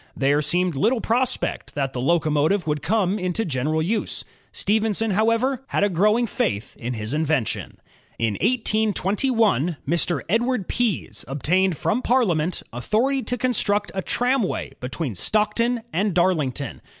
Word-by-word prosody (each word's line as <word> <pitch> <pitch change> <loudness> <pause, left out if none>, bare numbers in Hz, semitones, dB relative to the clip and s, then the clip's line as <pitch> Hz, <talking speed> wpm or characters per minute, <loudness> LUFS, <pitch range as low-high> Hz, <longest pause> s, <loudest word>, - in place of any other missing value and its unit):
There 140 +2 +2
seemed 175 +4 0
little 225 - +2
prospect 245 +3 -1
that 135 -2 -1
the 125 - -3
locomotive 155 +4 +2
would 150 -2 -1
come 205 0 +1
into 185 +4 -1
general 155 +2 0
use. 215 +6 -2 0.3
Stephenson, 220 +1 0
however, 230 +6 +1
had - - 0
a 205 - +3
grow 200 +4 +3
1 235 - +1
ing - - +2
faith 105 - -2
in 125 +1 -3
his 110 +3 -5
invention. 150 -6 -1 0.4
In 115 -2 0
182 220 -1 +1
1, 175 - +2
Mr. 170 -3 +2
Edward 230 +1 0
Pease 235 -8 -2
obtained 175 +6 +1
from 185 - 0
Parliament 185 -11 +1
authority 230 - +1
to 250 0 -3
construct 210 -5 0
a 190 - -2
tramway 245 +1 0
between 130 +1 -3
Stockton 220 - 0
and 195 +2 0
Darlington. 155 -7 0
190 Hz, 145 wpm, -23 LUFS, 150-225 Hz, 0.4 s, a